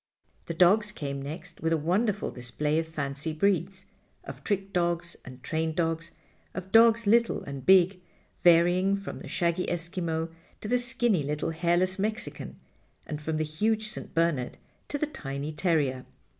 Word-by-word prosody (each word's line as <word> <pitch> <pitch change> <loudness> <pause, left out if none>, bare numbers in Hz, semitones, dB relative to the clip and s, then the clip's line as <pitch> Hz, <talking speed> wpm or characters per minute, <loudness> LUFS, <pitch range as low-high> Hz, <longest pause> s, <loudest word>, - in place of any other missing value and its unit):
The 165 - -4
dogs 205 +5 +5
came 140 -7 -5
next 155 +5 -7
with 160 - 0
a 165 - +3
wonderful 195 +7 0
display 150 +5 -1
of 165 - -3
fancy 145 0 -3
breeds, 190 +2 0 0.4
of - - -9
trick 195 -1 -2
dogs 170 -1 0
and 130 0 -11
trained 160 0 -1
dogs, 165 0 -1 0.5
of 190 0 -6
dogs 230 0 +6
little 230 +3 +3
and 140 -2 -7
big, 185 0 +5 0.4
varying 175 +3 +5
from 200 0 -6
the - - -9
shaggy 170 0 0
Eskimo 165 -1 -2 0.3
to - - -5
the 250 +3 +2
skinny 240 -6 +1
little 150 +3 -2
hairless 175 +3 +1
Mexican, 215 +3 -3 0.5
and 150 -2 -5
from 155 +1 -2
the 155 - +1
huge 215 +8 0
St. - - -9
Bernard 165 -7 +1 0.3
to 290 - -2
the 305 - 0
tiny 145 - -5
terrier. 150 -6 0
170 Hz, 155 wpm, -28 LUFS, 155-195 Hz, 0.5 s, dogs